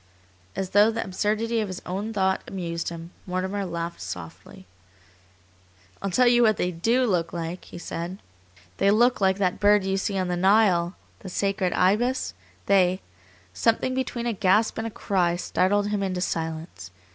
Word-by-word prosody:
As 190 -1 -3
though 205 +2 +6
the 225 0 -2
absurdity 215 +4 -1
of 215 - -1
his 185 -1 -6
own 200 +5 -3
thought 190 -3 +1
amused 170 -3 -4
him, 170 0 -8 0.2
Mortimer 190 +2 -2
laughed 170 -1 -5
softly. 90 +2 -9 1.4
"I'll 195 - -2
tell 250 +7 +3
you 240 0 +5
what 215 -3 +4
they 180 - 0
DO 230 +10 +1
look 180 -7 0
like," 170 +1 -5
he - - -10
said. 170 +1 -5 0.6
"They 195 - +3
look 240 +3 +3
like 190 0 +3
that 185 -3 0
bird 205 -1 +4
you 195 0 0
see 195 0 -1
on 185 -1 0
the 180 - -1
Nile, 190 -2 +3 0.2
the 190 - -8
sacred 195 0 0
Ibis, 220 +8 +1 0.3
they 185 -2 +3 0.3
" - - -27 0.2
Something 230 - +1
between 255 -2 -2
a 235 - 0
gasp 210 +3 +2
and 225 - -2
a - - -4
cry 180 -5 0
startled 200 +3 +1
him 210 -1 -1
into 185 -2 -2
silence. 160 - -4
190 Hz, 170 wpm, -25 LUFS, 175-210 Hz, 1.4 s, though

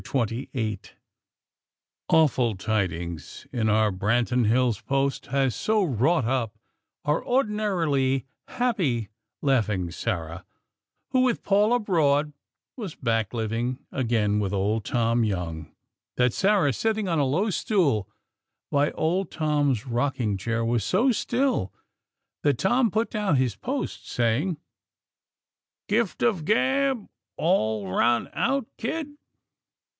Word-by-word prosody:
XXVIII 115 -3 -2 1.3
Awful 130 -8 +3
tidings 90 -5 -3
in 110 -3 +1
our 110 0 +3
Branton 115 +5 +1
Hills' 120 -2 +2
"Post," 135 +1 -1
had 135 -2 +1
so 215 -1 +1
wrought 140 - +2
up 115 -3 -1 0.5
our 150 +1 +1
ordinarily 180 - +1 0.2
happy, 170 - 0 0.3
laughing 110 - +1
Sarah, 85 -4 -4 0.7
who, 255 - +3
with 255 -2 +1
Paul 205 +2 +3
abroad, 155 -10 +2 0.4
was 210 - -6
back, 115 -4 0
living 120 +3 -2
again 115 -5 +1
with 100 -1 -1
old 100 +2 0
Tom 115 -1 +1
Young, 85 -6 -3 0.5
that 125 -1 +3
Sarah, 190 -8 +3
sitting 220 - -1
on 165 -3 +1
a - - +3
low 175 +11 +1
stool 150 - +1 0.6
by 145 +1 +3
old 180 +5 0
Tom's 145 -7 0
rocking 120 -3 -1
chair 115 +4 -2
was 115 -2 +1
so 225 - +3
still 245 - 0 0.7
that 145 -4 +2
Tom 235 - +2
put 220 +4 -1
down 210 -8 +1
his 130 -5 +1
"Post," - - -4
saying: 120 +9 0 1.3
"Gift 215 -1 0
of 210 -9 +2
gab 260 - +1 0.3
all 110 - +1
run 120 0 +2
out, 275 -3 0
kid?" 295 +5 -3
130 Hz, 115 wpm, -25 LUFS, -, 1.3 s, Awful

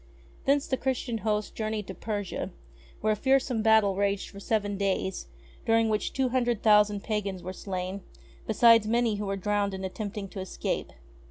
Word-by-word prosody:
Thence 280 +1 +3
the 260 - -1
Christian 250 -3 -2
host 210 -1 -1
journeyed 215 -1 -3
to 190 - -7
Persia, 205 0 -4 0.5
where 215 - +2
a - - -1
fearsome 265 -1 +2
battle 220 -3 +4
raged 200 0 0
for 200 - -10
seven 205 -1 -1
days, 195 -1 -1 0.4
during 225 -1 +3
which 215 -1 0
two 265 -1 0
hundred 240 -3 0
thousand 210 -2 +4
pagans 200 -4 -2
were 185 +1 -5
slain, 190 0 -4 0.5
beside 225 0 +6
many 230 -1 +2
who 205 0 -3
were 195 0 -1
drowned 200 0 0
in 190 - -6
attempting 200 +1 -4
to 195 - -7
escape. 190 - -3
210 Hz, 170 wpm, -28 LUFS, 200-225 Hz, 0.5 s, beside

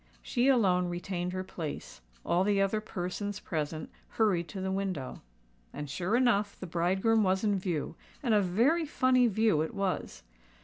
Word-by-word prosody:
She 245 0 +1
alone 190 -9 +3
retained 175 0 -3
her 185 0 -3
place: 165 - -7 0.2
all 175 +2 +2
the 200 0 +2
other 195 +2 +1
persons 205 0 -4
present 155 -3 -4 0.2
hurried 190 -6 +1
to 195 - -7
the 190 0 -2
window. 190 -9 -3 0.5
And, 145 +1 -6
sure 185 +8 0
enough, 220 -5 +2
the - - -6
bridegroom 190 +6 +2
was 190 +1 +1
in 205 -2 +2
view; 175 -5 -3 0.3
and 240 -4 +2
a 210 - +5
very 245 - +2
funny 255 -3 +3
view 220 -7 +2
it 160 - -3
was. 185 - -2
190 Hz, 165 wpm, -30 LUFS, 175-215 Hz, 0.5 s, a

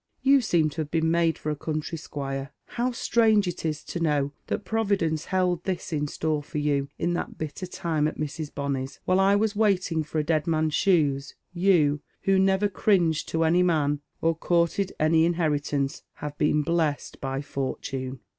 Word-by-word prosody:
You 275 0 +5
neem 160 -3 +3
to 160 - -3
have 150 - -4
been 160 0 +1
made 165 -1 +2
for 155 - -3
a - - -2
country 155 +2 -3
squire. 140 -2 -5 0.2
How 245 +1 -1
strange 220 -4 +3
it 175 - -4
is 155 -2 -2
to 175 - -5
know 145 -4 +1 0.2
that 205 - -3
Providence 195 -7 0
held 180 -2 0
this 185 -2 -3
in 150 -1 0
store 155 +1 -1
for 150 - -7
you 145 -2 0
in 175 - 0
thai 175 - -1
bitter 155 +4 -5
time 165 -4 -1
at 155 - -5
Mrs. 155 0 -4
Bonny's 135 -1 -3
1 185 - +2
While - - +4
I 200 +1 +5
was 210 0 +1
waiting 185 -6 +2
for 155 +1 -5
a 155 - +2
dead 155 0 0
man's 155 -1 +1
shoes, 145 -7 +2 0.2
you, 170 -6 +3 0.2
who 195 -1 +3
never 190 +1 +3
cringed 180 -5 +1
to 165 0 +1
any 170 +3 +4
man, 150 -5 +2 0.2
or 165 0 +2
courtiyi 170 +3 +1
nnv 160 +2 +3
iiilieritance, 145 -2 -1
have 145 0 -6
been 150 0 +2
blest 160 -3 -1
by 135 +1 -3
Fortune." 135 -2 -4
160 Hz, 185 wpm, -26 LUFS, 145-180 Hz, 0.2 s, You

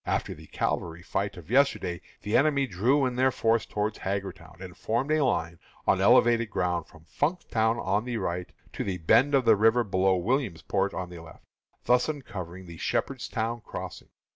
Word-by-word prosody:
After - - -1
the - - -14
cavalry 85 0 -2
fight 100 +1 -2
of 90 +3 -11
yesterday 125 -10 +2 0.2
the 105 - -1
enemy 140 0 +3
drew 130 +7 +2
in 125 -1 -2
their 130 +1 +4
forces 115 -2 +1
towards 105 +1 -2
Hagerstown, 95 -1 -5
and 90 -2 -9
formed 120 +7 -1
a 155 -1 +3
line 85 -10 -1 0.3
on - - +3
elevated 115 -1 +5
ground 90 -4 -1
from 80 -2 -18
Funkstown 120 - 0
on 105 +1 0
the 120 -2 -2
right 90 -3 -3 0.2
to - - -3
the 95 -2 -2
bend 130 - +4
of 130 -3 +2
the 110 -1 +6
river 115 +3 +4
below 95 -2 +2
Williamsport 95 - -1
on 90 +1 -5
the 85 - -9
left, 80 -1 -15 0.4
thus 125 +4 +3
uncovering 95 - -6
the 85 -1 -10
Shepherdstown 115 +7 -2
crossing. - - -8
105 Hz, 175 wpm, -27 LUFS, 90-125 Hz, 0.4 s, the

